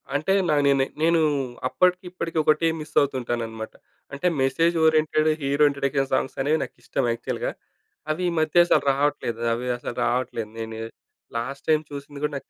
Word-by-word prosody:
అంటే 155 +7 +1 0.2
నా 150 - +4
నేనే 135 -1 +3 0.2
నేను 165 +1 +4 0.5
అప్పటికి 180 +6 +2
ఇప్పటికి 170 -2 -4
ఒకటే 155 +2 +3
మిస్ 150 0 -9
అవుతుంటాననమాట. 120 -5 -3 0.4
అంటే 140 +6 -1
message 165 +6 +2
oriented 155 0 +3
hero 140 +2 +3
introduction 140 -1 -1
songs 130 - 0
అనేవి 150 +4 +2
నాకు - - -9
ఇష్టం 135 - -1
యాక్చువల్‌గా. 115 0 -3 0.6
అవి 165 +4 -2
ఈ - - -2
మధ్య 160 +2 +5
అసలు - - +3
రావట్లేదు 135 -4 -1
అవి 120 +2 -3
అసలు 120 - -6
రావట్లేదు. 120 -3 -1
నేను 110 0 -5 0.6
లాస్ట్ 135 +4 -5
టైమ్ 155 0 +3
చూసింది 140 0 -8
గూడా 150 0 -1
నాకు - - -12
140 Hz, 160 wpm, -24 LUFS, 130-155 Hz, 0.6 s, మధ్య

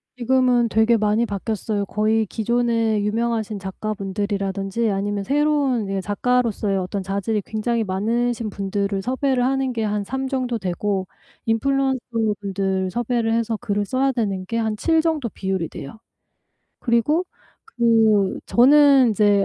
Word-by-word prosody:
지금은 250 -1 +2
되게 220 +2 +3
많이 215 +2 +2
바뀌었어요. 205 0 -3
거의 215 +1 +1
기존에 230 0 0
유명하신 220 0 -1
작가분들이라든지 200 +1 -2
아니면 200 +1 -2
새로운 280 -5 +1
예 195 0 -1
작가로서의 210 -1 0
어떤 190 +1 -3
자질이 200 +3 -2
굉장히 225 +1 -1
많으신 225 +3 -1
분들을 200 0 -2
섭외를 255 +2 0
하는 265 0 0
게 225 - -2
한 210 -1 -1
3 265 +5 -3
정도 255 -3 -2
되고 190 +1 -2 0.4
인플루언서분들 220 -7 -1
섭외를 235 0 0
해서 230 -1 0
글을 205 -3 -2
써야 270 +4 +1
되는 200 -6 -2
게 230 +4 -3
한 220 -1 0
7 325 +6 +2
정도 315 -7 -1
비율이 190 -5 -3
돼요. 140 +10 -9 0.8
그리고 255 +9 +1 0.5
그 220 -4 +3
저는 275 -1 +6
이제 205 -1 +3
220 Hz, 310 characters per minute, -22 LUFS, 200-245 Hz, 0.8 s, 저는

